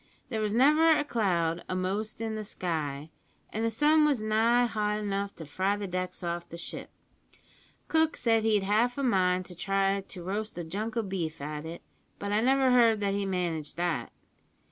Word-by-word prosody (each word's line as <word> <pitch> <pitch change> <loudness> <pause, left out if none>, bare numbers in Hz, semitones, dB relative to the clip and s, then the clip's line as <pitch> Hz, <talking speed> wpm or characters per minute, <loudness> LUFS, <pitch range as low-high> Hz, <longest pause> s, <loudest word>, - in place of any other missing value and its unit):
There 220 -4 -2
was 210 -1 0
never 300 +8 +5
a 310 -2 +4
cloud 175 - 0
a'most 195 +4 -2
in 225 -1 -2
the 215 0 -4
sky, 155 -6 -4 0.4
and 220 - -1
the 230 - +2
sun 300 +7 +4
was 290 -5 +3
nigh 225 +3 +3
hot 210 -2 -1
enough 200 -1 -2
to 160 - -8
fry 190 +7 0
the 205 - -4
decks 185 0 -4
off 170 0 -3
the 170 - -8
ship. - - -7 1.0
Cook 320 0 +2
said 225 -2 +2
he'd 215 -2 +2
half 225 +6 +2
a 280 - -1
mind 185 -6 +2
to 180 - -9
try 195 +2 +1
to 185 -2 -9
roast 210 +3 -4
a 175 - -3
junk 215 +7 -4
o' 230 - +1
beef 175 -5 -3
at 150 +2 -5
it, 170 +1 -8 0.3
but 200 0 -4
I 210 +1 +2
never 265 +1 +3
heard 230 -3 +5
that 200 -1 +1
he 200 0 -1
managed 170 -5 -2
that. 175 -2 -1
200 Hz, 190 wpm, -29 LUFS, 180-225 Hz, 1.0 s, never